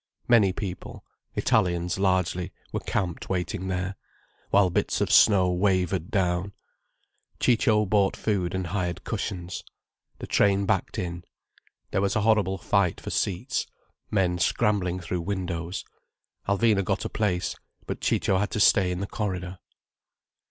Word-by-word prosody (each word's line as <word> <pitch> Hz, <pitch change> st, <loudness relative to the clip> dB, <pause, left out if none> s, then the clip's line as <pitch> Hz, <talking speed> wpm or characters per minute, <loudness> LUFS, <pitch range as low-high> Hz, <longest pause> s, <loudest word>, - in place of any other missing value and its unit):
Many 110 Hz, -6 st, +5 dB
people, 95 Hz, -1 st, -6 dB, 0.3 s
Italians, 90 Hz, 0 st, +1 dB
largely, 90 Hz, -1 st, +1 dB, 0.2 s
were -, -, -2 dB
camped 90 Hz, -4 st, -3 dB
waiting 95 Hz, +1 st, -2 dB
there, 95 Hz, +1 st, -2 dB, 0.5 s
while 100 Hz, -2 st, +4 dB
bits -, -, 0 dB
of -, -, 0 dB
snow 95 Hz, -4 st, +6 dB
wavered 95 Hz, -1 st, +1 dB
down. 95 Hz, -1 st, 0 dB, 0.9 s
Ciccio 110 Hz, -3 st, +3 dB
bought 100 Hz, 0 st, +2 dB
food 95 Hz, -4 st, -1 dB
and 95 Hz, -1 st, -2 dB
hired 90 Hz, 0 st, -3 dB
cushions. 95 Hz, -4 st, -4 dB, 0.5 s
The -, -, -7 dB
train 100 Hz, 0 st, +2 dB
backed 95 Hz, -2 st, 0 dB
in. 85 Hz, -1 st, -4 dB, 0.7 s
There 95 Hz, -, +1 dB
was 100 Hz, 0 st, 0 dB
a 110 Hz, -, +2 dB
horrible 105 Hz, -3 st, +2 dB
fight 95 Hz, -1 st, +1 dB
for -, -, -6 dB
seats, 115 Hz, +9 st, -1 dB, 0.4 s
men 90 Hz, -4 st, +1 dB
scrambling 90 Hz, -1 st, +1 dB
through 90 Hz, 0 st, -3 dB
windows. 90 Hz, -2 st, -3 dB, 0.6 s
Alvina 100 Hz, 0 st, +3 dB
got -, -, -1 dB
a -, -, +1 dB
place—but 95 Hz, -5 st, -3 dB
Ciccio 95 Hz, -, +1 dB
had 105 Hz, -, 0 dB
to -, -, -3 dB
stay 95 Hz, -2 st, +5 dB
in 90 Hz, +1 st, -3 dB
the -, -, -1 dB
corridor. 95 Hz, -4 st, -4 dB
95 Hz, 135 wpm, -26 LUFS, 90-100 Hz, 0.9 s, snow